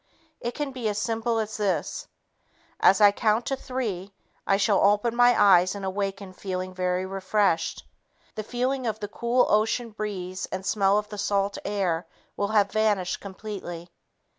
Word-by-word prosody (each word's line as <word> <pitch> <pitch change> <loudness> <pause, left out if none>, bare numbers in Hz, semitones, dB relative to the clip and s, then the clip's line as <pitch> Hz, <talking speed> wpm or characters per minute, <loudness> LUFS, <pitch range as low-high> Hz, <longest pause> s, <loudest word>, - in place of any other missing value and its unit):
It 240 +1 -4
can 290 -2 -3
be 245 -4 -2
as 205 - -3
simple 225 +2 -1
as 220 -1 -2
this: 205 -3 -1 0.7
"As 195 - +5
I 205 -1 +8
count 220 +2 +1
to 270 - -1
three, 210 -8 -4 0.3
I 195 - +4
shall 200 0 +3
open 205 +3 +3
my 245 0 +5
eyes 185 -2 +5
and 200 -1 -5
awaken 195 0 -3
feeling 185 -1 -4
very 180 0 -1
refreshed. 190 -2 0 0.5
The 215 - -4
feeling 250 +3 -2
of 220 -1 -2
the 205 - -4
cool 235 +4 +1
ocean 225 +2 +1
breeze 190 -3 -4
and 190 0 -4
smell 195 +1 +3
of 210 0 -2
the 210 - -7
salt 200 0 0
air 180 -5 -1 0.3
will 200 - -1
have 205 -2 +2
vanished 210 -4 +1
completely." 190 -4 -7
205 Hz, 165 wpm, -26 LUFS, 190-220 Hz, 0.7 s, I